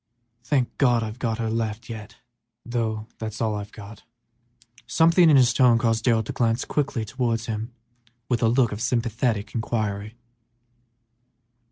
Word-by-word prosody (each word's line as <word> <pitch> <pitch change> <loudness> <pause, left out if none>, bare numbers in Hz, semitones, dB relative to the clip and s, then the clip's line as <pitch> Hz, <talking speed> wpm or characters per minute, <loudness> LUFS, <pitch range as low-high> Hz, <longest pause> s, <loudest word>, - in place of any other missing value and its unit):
Thank 130 -1 0
God, 120 -4 +3
I've 110 +2 -6
got 115 -4 -1
her 115 -1 -2
left 115 0 -3
yet, 110 0 -8 0.5
but 120 - -10
she 120 - -1 0.5
is 110 -1 -7
about 105 -1 -3
all." 105 +1 -9 0.9
Something 165 +1 +5
in 145 - +7
his 125 -2 +5
tone 125 -2 +5
caused 115 -1 0
Darrell 115 -3 +3
to - - -6
glance 115 0 0
quickly 135 -6 -1
towards 115 -1 -1
him 110 +1 -4 0.6
with 120 -3 0
a 115 - +4
look 120 0 +3
of 105 +1 -5
sympathetic 115 -2 -1
inquiry. 110 -2 -2
115 Hz, 150 wpm, -24 LUFS, 110-125 Hz, 0.9 s, in